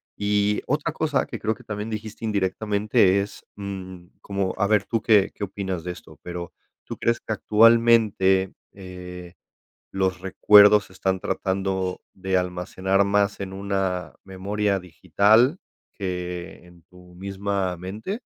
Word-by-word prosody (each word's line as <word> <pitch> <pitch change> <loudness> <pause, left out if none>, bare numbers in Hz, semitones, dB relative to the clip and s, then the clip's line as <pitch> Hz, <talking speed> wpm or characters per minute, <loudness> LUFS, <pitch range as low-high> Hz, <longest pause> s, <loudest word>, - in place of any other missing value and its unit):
Y 105 0 +1
otra 150 +3 -1
cosa 155 -3 0
que - - -7
creo 110 +1 0
que - - -17
también 105 +1 -5
dijiste 110 0 -7
indirectamente 100 0 +2
es, 100 - -8
mm, 95 -3 -7 0.2
como, 100 -1 -2
a 100 - +2
ver 105 -1 +2
tú 115 -2 -1
qué 105 -4 +4
qué 105 - -6
opinas 95 -3 -4
de 90 - -4
esto, - - -13
pero 90 0 -6 0.3
¿tú - - -7
crees 115 0 0
que 110 - -4
actualmente, 110 -4 +4 0.2
eh, 90 -1 -10 0.6
los 95 -1 -1
recuerdos 105 +2 +6
se 95 - -18
están 95 0 -1
tratando 95 -1 -2
de 95 0 -1
almacenar 95 +2 0
más 100 0 +1
en 95 -1 -5
una 95 -5 -2
memoria 100 +1 -1
digital 100 - +3 0.4
que 90 -3 -5
en 85 -1 -19
tu 90 -1 -18
misma 100 0 -3
mente? 105 - -6
95 Hz, 140 wpm, -24 LUFS, 95-105 Hz, 0.6 s, recuerdos